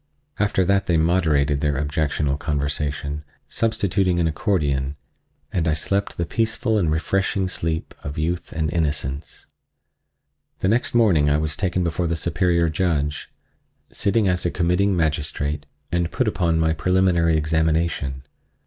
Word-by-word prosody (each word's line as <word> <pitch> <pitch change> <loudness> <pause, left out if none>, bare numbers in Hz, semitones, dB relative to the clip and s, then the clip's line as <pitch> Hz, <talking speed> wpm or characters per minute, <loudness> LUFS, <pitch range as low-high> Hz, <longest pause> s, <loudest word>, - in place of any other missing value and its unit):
After 100 -2 +2
that 100 +1 +2
they 85 - +3
moderated 80 -4 +2
their 75 -2 +1
objectionable 75 -1 -1
conversation, 75 0 -2 0.2
substituting 95 -5 +1
an 85 - +2
accordion, 75 -5 0 0.6
and 85 -4 0
I 80 - +3
slept 100 +6 -1
the 85 - -1
peaceful 110 +4 0
and 85 -5 +1
refreshing 95 +4 0
sleep 80 -3 -3
of 70 0 -6
youth 85 +3 -2
and 80 -1 -2
innocence. 70 -3 -2 1.1
The 95 - 0
next 120 +2 +1
morning 90 -11 +4
I 75 - +3
was 75 0 -1
taken 90 -2 0
before 85 +1 -1
the 85 - 0
Superior 85 0 +1
Judge, 80 -3 -1 0.6
sitting 105 0 +1
as 90 -1 +1
a 85 - +1
committing 90 +3 +1
magistrate, 75 -2 -1 0.2
and 85 -1 0
put 125 - -1
upon 85 -6 +1
my 80 0 +2
preliminary 85 -1 +2
examination. 80 -3 0
80 Hz, 140 wpm, -22 LUFS, 75-90 Hz, 1.1 s, morning